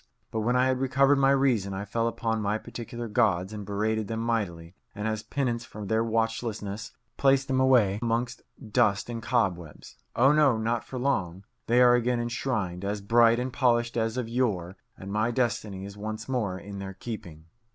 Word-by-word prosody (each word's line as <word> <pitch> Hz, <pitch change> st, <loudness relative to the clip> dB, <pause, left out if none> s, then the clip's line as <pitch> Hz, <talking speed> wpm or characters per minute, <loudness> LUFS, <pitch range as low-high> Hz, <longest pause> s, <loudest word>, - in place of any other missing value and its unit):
But 110 Hz, -, -2 dB
when 120 Hz, +3 st, +1 dB
I 125 Hz, 0 st, +4 dB
had 130 Hz, -1 st, +1 dB
recovered 135 Hz, +2 st, +3 dB
my 135 Hz, 0 st, +4 dB
reason, 125 Hz, -8 st, +2 dB
I 100 Hz, +2 st, -4 dB
fell 115 Hz, +3 st, -1 dB
upon 115 Hz, -1 st, -1 dB
my 105 Hz, +1 st, 0 dB
particular 120 Hz, +1 st, -7 dB
gods 100 Hz, -2 st, +1 dB
and 105 Hz, -1 st, -5 dB
berated 110 Hz, +1 st, -1 dB
them 115 Hz, 0 st, -3 dB
mightily, 100 Hz, -8 st, -2 dB, 0.2 s
and 105 Hz, +2 st, -3 dB
as 110 Hz, -1 st, -2 dB
penance 120 Hz, -2 st, -2 dB
for 105 Hz, -2 st, -8 dB
their 110 Hz, +3 st, +1 dB
watchlessness 110 Hz, -2 st, -2 dB, 0.3 s
placed 135 Hz, -1 st, +3 dB
them 130 Hz, -1 st, +1 dB
away 120 Hz, -7 st, +4 dB
amongst 120 Hz, +1 st, -1 dB, 0.3 s
dust 100 Hz, +3 st, +2 dB
and 115 Hz, -1 st, -5 dB
cobwebs. 95 Hz, -, -2 dB, 0.2 s
Oh 135 Hz, +4 st, +5 dB
no, 150 Hz, -6 st, +4 dB
not 115 Hz, +1 st, -1 dB
for 130 Hz, -, -7 dB
long. 100 Hz, -9 st, -1 dB, 0.2 s
They 120 Hz, +2 st, +4 dB
are 120 Hz, 0 st, +7 dB
again 120 Hz, 0 st, +2 dB
enshrined, 115 Hz, -6 st, -2 dB
as 100 Hz, +1 st, -2 dB
bright 115 Hz, +3 st, +4 dB
and 125 Hz, 0 st, -3 dB
polished 120 Hz, -3 st, +2 dB
as 115 Hz, 0 st, -1 dB
of 125 Hz, -3 st, -2 dB
yore, 105 Hz, -7 st, -1 dB, 0.2 s
and 95 Hz, +1 st, -7 dB
my 110 Hz, +2 st, +1 dB
destiny 110 Hz, -5 st, -1 dB
is 100 Hz, 0 st, -9 dB
once 110 Hz, +1 st, -5 dB
more 110 Hz, -8 st, -1 dB
in 100 Hz, +1 st, -8 dB
their 95 Hz, -1 st, -6 dB
keeping. 90 Hz, -9 st, -8 dB
115 Hz, 185 wpm, -27 LUFS, 100-125 Hz, 0.3 s, are